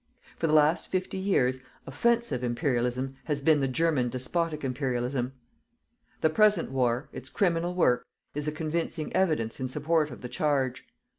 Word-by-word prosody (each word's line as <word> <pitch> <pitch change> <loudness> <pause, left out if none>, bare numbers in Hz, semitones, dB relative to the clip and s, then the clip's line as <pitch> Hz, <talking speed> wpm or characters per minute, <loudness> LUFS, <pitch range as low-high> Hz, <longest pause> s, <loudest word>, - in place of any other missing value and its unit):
For 165 - -1
the 155 - +1
last 155 +2 +4
fifty 185 0 -2
years, 130 -10 +2 0.3
"OFFENSIVE" 225 - 0
IMPERIALISM 125 +1 -1
has 150 -3 -1
been 150 +1 +4
the 135 - +1
GERMAN 135 -2 +1
DESPOTIC 150 +5 -2
IMPERIALISM. 125 -1 -1 0.9
The 160 - +4
present 210 -5 +3
war 125 0 0
its - - -7
criminal 175 -2 0
work 125 -9 +2 0.3
is 150 0 -3
the - - +1
convincing 155 0 -3
evidence 155 -12 +1
in 130 - -1
support 150 +3 +1
of 125 - -10
the 125 - -5
charge. 135 -4 0
150 Hz, 150 wpm, -28 LUFS, 130-165 Hz, 0.9 s, last